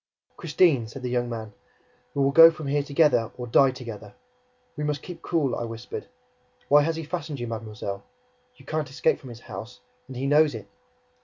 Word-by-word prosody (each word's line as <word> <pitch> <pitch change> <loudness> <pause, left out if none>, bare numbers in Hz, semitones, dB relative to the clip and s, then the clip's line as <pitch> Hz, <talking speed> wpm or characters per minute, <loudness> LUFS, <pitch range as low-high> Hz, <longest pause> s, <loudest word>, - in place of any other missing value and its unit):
"Christine," 155 -7 +2
said 125 +4 -10
the 125 - -2
young 120 -1 0
man. 110 -3 -6 0.6
"We 140 - +2
will 135 - +3
go 165 +3 +10
from 155 -2 -7
here 145 +1 +1
together 140 -5 +2
or 125 - -5
die 135 +3 +5
together!" 120 -5 -8 0.6
"We 150 - -4
must 150 -1 -2
keep 175 -2 -9
cool," 155 -7 0
I - - -3
whispered. 115 +1 -7 0.6
"Why 145 +1 +7
has 160 +2 0
he 165 - -4
fastened 155 -3 -5
you, 120 - -3
mademoiselle? 110 -3 -5 0.5
You - - -18
can't 155 -3 -2
escape 135 - +1
from 130 - -11
his 120 0 -10
house; 105 +3 -9 0.3
and 130 -2 -8
he 135 - -2
knows 150 -1 +4
it!" 105 -3 -7
135 Hz, 190 wpm, -26 LUFS, 115-150 Hz, 0.6 s, go